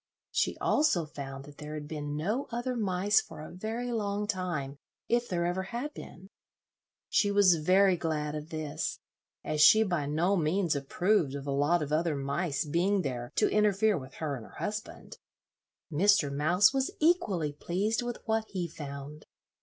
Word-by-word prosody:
She - - 0
also 290 - +2
found 135 -2 -8
that 145 0 -14
there 150 0 -6
had 150 -1 -6
been 150 -1 -4
no 215 - -1
other 240 +2 -2
mice 200 -2 +2
for 160 - -12
a 155 - -8
very 225 +6 -4
long 205 -2 -1
time, 175 -9 -3 0.3
if 240 0 +1
there 170 -1 0
ever 175 +2 0
had 240 +10 -5
been. 190 - -11 0.8
She 205 - +2
was 200 -4 +5
very 190 +2 +5
glad 150 -3 -2
of 155 +1 -6
this, 155 -2 -3 0.5
as 155 -1 -1
she 215 +9 +8
by 175 -8 -1
no 170 +7 +1
means 170 0 +1
approved 160 +2 +1
of 140 -1 -6
a 140 - -2
lot 145 +4 +2
of 145 - -6
other 160 0 +1
mice 140 +3 -1
being 180 +6 +1
there 120 -3 -4
to - - +3
interfere 210 0 +3
with 130 -1 -7
her 150 -3 -3
and 120 - -8
her - - -14
husband. 210 0 -6 0.7
Mr. 160 -3 +3
Mouse 175 - +4
was 270 -1 +1
equally 205 - +2
pleased 195 +9 -1
with 240 -1 -4
what 220 0 0
he 180 -3 -3
found. 145 -1 -8
175 Hz, 170 wpm, -30 LUFS, 150-205 Hz, 0.8 s, she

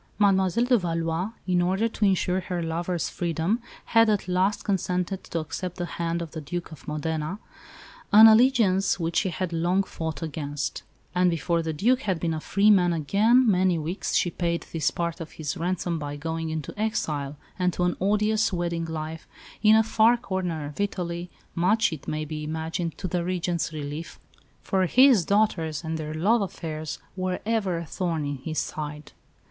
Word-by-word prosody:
Mademoiselle 195 +2 +3
de 245 -2 +4
Valois, 165 +1 -1 0.2
in 180 -1 +2
order 190 +5 +1
to 220 -2 -1
ensure 185 -1 +2
her 180 -2 -3
lover's 170 +1 -2
freedom, 170 +6 -1 0.2
had 225 -1 +4
at 205 -3 0
last 185 +3 +1
consented 185 -1 -1
to - - -5
accept 175 +3 -4
the 175 - -2
hand 170 0 -2
of 165 - -9
the 160 - -6
Duke 175 +5 -5
of 155 - -12
Modena, 155 +3 -2 0.7
an 215 +2 +10
alliance 220 -5 +5
which 165 0 -1
she 190 - +2
had 175 +1 -3
long 175 +4 +2
fought 160 -5 -5
against; 145 -2 -4 0.3
and 180 0 +3
before 170 +1 0
the 160 -1 -2
Duc 235 +12 +2
had 190 -9 -1
been 165 0 -1
a 160 - -2
free 200 +6 +3
man 180 -4 +4
again 210 - +3
many 185 -4 +3
weeks 165 +5 -3
she 175 - +2
paid 170 0 -2
this 165 -2 +1
part 170 0 -3
of 160 - -8
his 155 +1 -4
ransom 175 -1 -2
by 145 -1 -5
going 160 +2 -3
into 155 -2 -4
exile, 150 -10 -2 0.2
and 180 0 +2
to 180 - -1
an 180 0 +1
odious 210 +2 +2
wedded 170 -2 -2
life, 160 0 -5 0.3
in 215 0 +6
a 220 - +5
far 225 +2 +4
corner 185 -8 -3
of 145 +4 -9
Italy 175 -3 -3 0.2
much, 200 +4 +2
it 155 - -9
may 155 0 -2
be 155 0 -5
imagined, 160 +2 -3
to - - -4
the 175 0 -1
Regent's 175 -2 -1
relief, 150 +1 -6 0.5
for 190 -1 +1
his 255 -3 +6
daughters 170 -6 +1
and 160 0 -3
their 155 0 -5
love 210 +8 +3
affairs 155 -5 -4 0.2
were 185 -1 -2
ever 210 -6 0
a 165 - -5
thorn 165 -3 -2
in 145 -1 -3
his 155 +4 -5
side. 150 -1 -4
175 Hz, 180 wpm, -26 LUFS, 160-195 Hz, 0.7 s, an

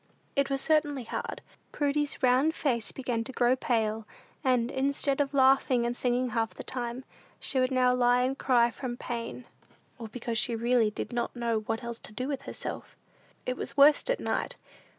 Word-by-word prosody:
It 280 -1 +2
was 275 -1 0
certainly 295 -4 +1
hard. 230 - -5 0.3
Prudy's 290 -1 -1
round 255 +2 +4
rosy 320 - +2
face 240 -8 0
began 245 -3 -2
to 265 - -5
grow 245 0 +3
pale; 220 -4 -1 0.4
and, 250 -1 +2
instead 275 +1 +2
of 275 -1 -1
laughing 265 -3 +4
and 240 0 -1
singing 250 0 0
half 225 -1 -1
the - - -7
time, 245 0 -4 0.3
she 265 - +2
would 255 0 +2
now 255 -1 +3
lie 245 0 +3
and 260 +1 0
cry 240 -3 +3
from 245 -1 -5
pain, 235 0 -5 0.5
or 230 - -6
because 230 0 -3
she 235 -1 0
really 235 -1 +2
did 210 - -6
not 240 +1 -2
know 235 -2 0
what 225 +2 -2
else 235 -1 -5
to - - -11
do 255 +4 -3
with 280 -2 -3
herself. - - -6 0.5
It 255 - -1
was - - -6
worst 290 - +6
at - - +1
night. - - -2
250 Hz, 190 wpm, -29 LUFS, 235-270 Hz, 0.5 s, worst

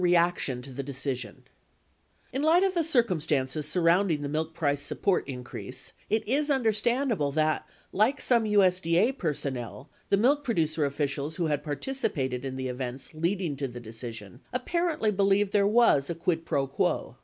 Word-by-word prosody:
MILK - - +4
PRODUCER 175 -1 +6
REACTION 135 -8 -3
TO 135 - -9
THE 135 +2 -4
DECISION 130 -5 -5 0.9
In 265 - -1
light 325 +4 +4
of 385 -1 +2
the 340 -2 +1
circumstances 155 - +1
surrounding 170 -1 +2
the 140 - -3
milk 160 +2 -2
price 145 -3 0
support 185 +6 0
increase, 125 0 -7 0.2
it 220 0 0
is 290 +5 +1
understandable 235 - +1
that, 155 0 0 0.2
like 230 +8 +2
some 235 -3 +3
USD 185 -5 +3
A 225 +8 +4
personnel, 140 - -4 0.2
the 200 - +4
milk 280 +7 +3
producer 160 - +1
officials 140 +1 -2
who 170 - -1
had 150 -2 -1
participated 145 - -2
in 135 -1 -4
the 130 0 -3
events 130 +2 -5
leading 170 0 -1
to 140 0 -2
the 120 -1 -8
decision 115 -2 -8
apparently 305 -2 0
believed 200 0 +2
there 200 -1 +4
was 210 -11 +4
a 170 - -2
quid 165 0 -1
pro 140 -3 0
quo. 135 - -1
165 Hz, 165 wpm, -28 LUFS, 140-215 Hz, 0.9 s, PRODUCER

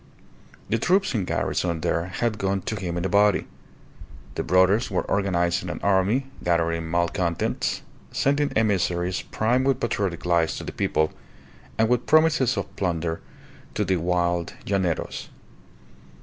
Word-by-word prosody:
The 115 - 0
troops 190 - +2
in 105 -6 0
garrison 85 -2 -1
there 85 +2 0
had 110 +4 -2
gone 95 0 0
to 110 - -3
him 90 -4 -3
in 85 - -2
a - - +2
body. 100 +1 +3 0.9
The - - -2
brothers 95 +6 +3
were 95 - 0
organizing 90 -4 0
an - - -4
army, 100 +7 +2 0.2
gathering 85 -1 0
malcontents, 85 0 -1 0.3
sending 145 +1 +1
emissaries 90 -4 +1
primed 125 +4 0
with 135 -2 +2
patriotic 100 -9 -2
lies 85 -2 +2
to - - -6
the - - -5
people, 80 0 0 0.6
and 110 - +3
with 125 +1 +1
promises 155 -4 +4
of - - -4
plunder 85 -3 -1 0.5
to - - 0
the 95 - +1
wild 85 0 0
llaneros. 95 -4 -1
95 Hz, 140 wpm, -24 LUFS, 85-110 Hz, 0.9 s, promises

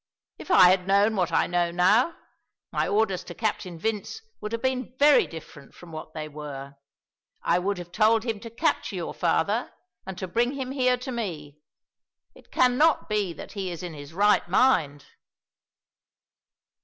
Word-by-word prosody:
If - - -10
I 185 - +7
had 185 0 +2
known 200 +3 +3
what 180 -4 0
I - - +3
know 175 -1 0
now, 205 - +3 0.5
my - - 0
orders 205 -3 +1
to 175 - -9
Captain 200 -5 -3
Vince 220 - -4 0.2
would 210 0 -5
have 230 +1 -4
been 260 -1 -2
very 290 +1 +5
different 150 -3 -12
from 175 -2 -13
what 155 0 -9
they 155 -1 -4
were. 145 -2 -8 0.7
I 175 - +2
would 195 +2 -1
have 175 -1 -9
told 220 +3 +3
him 225 -3 -3
to 230 +2 -9
capture 240 -3 -1
your 175 -2 -4
father, 200 +7 0 0.4
and 190 -2 -6
to 185 - -4
bring 240 +7 0
him 265 -2 -4
here 255 -2 +2
to 255 +2 -6
me. 160 - -5 0.7
It - - -20
cannot 255 +6 +3
be 210 -4 0
that - - -10
he 195 -3 -4
is 175 0 -7
in 175 -2 -6
his 145 0 -10
right 205 +1 +2
mind!" 165 - +2
195 Hz, 170 wpm, -26 LUFS, 170-235 Hz, 0.7 s, I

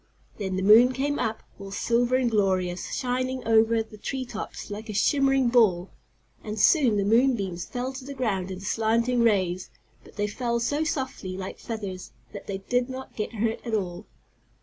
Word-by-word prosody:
Then 190 -2 -2
the 190 - -1
moon 230 +5 +7
came 285 +3 -1
up, 225 -2 -2 0.2
all 195 0 -8
silver 240 +5 +1
and 255 -2 +1
glorious; 185 -4 0
shining 255 0 -2
over 225 0 +4
the 215 -1 -15
tree 260 +3 -3
tops 215 -2 -7
like 215 +2 -7
a - - -3
shimmering 270 +3 +3
ball, 200 -7 +3 0.5
and 215 -1 -5
soon 250 - +4
the 200 - +1
moon 245 +5 +4
beams 185 -5 -4
fell 250 +2 -4
to 265 0 -8
the 280 0 -7
ground 200 -8 -1
in 185 0 -6
slanting 230 +4 +1
rays, 185 -5 +1 0.3
but - - -17
they 205 - 0
fell 235 +3 -1
so 285 +6 0
softly, 260 -11 -3
like 190 0 -6
feathers, 200 -5 -6 0.2
that 200 - -9
they 195 - -3
did 245 +6 -1
not 260 0 -8
get 215 +2 -4
hurt 225 +1 -1
at 230 -2 -2
all. 185 -1 -4
225 Hz, 185 wpm, -26 LUFS, 195-250 Hz, 0.5 s, moon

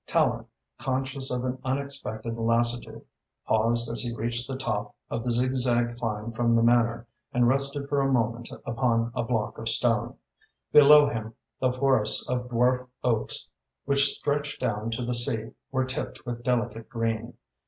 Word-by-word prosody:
Tallente, - - +1 0.3
conscious 135 0 -2
of 125 0 -2
an 130 0 -3
unexpected 130 -5 -3
lassitude, 115 +1 0 0.4
paused 115 +2 +2
as 115 - -1
he 120 - -3
reached 120 +2 -2
the 135 - -4
top 105 -6 -3 0.2
of 115 - -2
the 125 - -2
zigzag 120 -1 +2
climb 115 -1 -3
from 115 0 +1
the 115 - +3
Manor 120 0 +3 0.3
and 120 0 +3
rested 140 +2 +1
for 140 -1 +1
a 135 0 +1
moment 115 -1 0 0.2
upon 115 -1 0
a - - -1
block 115 -2 -2
of 115 0 -1
stone. 115 -1 +3 0.6
Below 150 0 +8
him, 110 -4 -4 0.2
the 130 -1 +2
forests 130 -4 +2
of 125 0 -2
dwarf 125 +1 +2 0.2
oaks 115 -3 -1 0.4
which 140 0 +3
stretched 145 0 -2
down 110 -3 -1
to 115 +1 -3
the 125 - -1
sea 120 -2 -1 0.2
were 130 -1 +1
tipped 130 0 -5
with 120 -1 -5
delicate 115 -2 -1
green. 115 0 -2
120 Hz, 160 wpm, -27 LUFS, 115-130 Hz, 0.6 s, Below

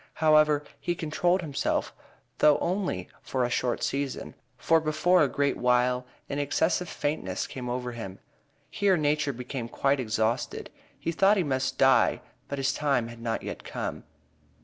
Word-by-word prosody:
However, 155 -2 +4 0.2
he 175 - -2
controlled 175 +3 +1
himself, 150 -5 -1 0.5
though 150 -1 +6
only 180 - -2
for 130 -1 -1
a 120 - -3
short 120 -1 0
season, 140 -1 -2 0.2
for 165 0 +3
before 160 +4 +3
a 150 - +5
great 140 +1 0
while 125 0 +2 0.2
an 140 - -3
excessive 160 +5 +1
faintness 95 -11 -2
came 125 -2 -6
over 125 0 -3
him. 100 -5 -7 0.5
Here 195 -3 +2
nature 150 -1 +1
became 125 -1 -6
quite 140 +2 +1
exhausted. 110 -1 -1 0.3
He 165 - -2
thought 195 +5 +4
he 185 - +2
must 130 -3 -1
"die;" - - +4 0.3
but 140 - -4
his 135 0 +1
time 135 -6 0
had 120 -1 -11
not 115 -1 -2
yet - - -6
come. - - -5
140 Hz, 155 wpm, -27 LUFS, 125-155 Hz, 0.5 s, though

